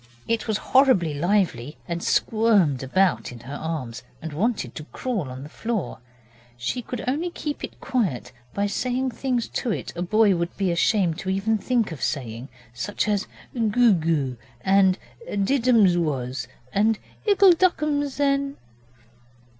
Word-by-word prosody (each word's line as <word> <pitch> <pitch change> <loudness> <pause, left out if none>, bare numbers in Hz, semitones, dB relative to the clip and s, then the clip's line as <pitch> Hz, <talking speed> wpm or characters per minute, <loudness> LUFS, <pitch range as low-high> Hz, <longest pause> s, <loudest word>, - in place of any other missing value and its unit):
It 230 0 0
was 215 -2 +1 0.2
horribly 255 - +5
lively, 165 - 0
and 170 -1 -3
squirmed 205 - +2
about 180 +6 +1
in 120 -1 -10
her 130 +4 -8
arms, 145 -7 -4 0.2
and 160 -2 -6
wanted 190 - -1
to 150 - -8
crawl 205 - -3
on 130 +1 -7
the - - -8
floor. 220 +4 -3 0.6
She 120 - -2
could 245 0 -6
only 305 +7 0
keep 300 -3 -5
it - - -7
quiet 185 - -1 0.2
by 200 +7 -1
saying 250 +5 -1
things 245 -1 -1
to 250 - -2
it - - -4
a 175 - -4
boy 210 +2 +4
would 170 0 -3
be 195 -3 +1
ashamed 175 -1 +1
even 200 +3 +1
to - - -15
think 240 -6 +1
of 155 - -7
saying, 125 -1 -3 0.2
such 165 - -2
as 205 -1 0 0.3
'Goo 230 -1 +4
goo', 155 -7 0 0.2
and 190 +1 +4 0.5
'Did 255 +3 +1
ums 205 -7 +6
was', 130 -5 -2 0.3
and 215 +2 +3 0.3
'Ickle 395 -2 +7
ducksums, 300 -6 +1
then'. 280 -1 +1
200 Hz, 155 wpm, -24 LUFS, 155-245 Hz, 0.6 s, Ickle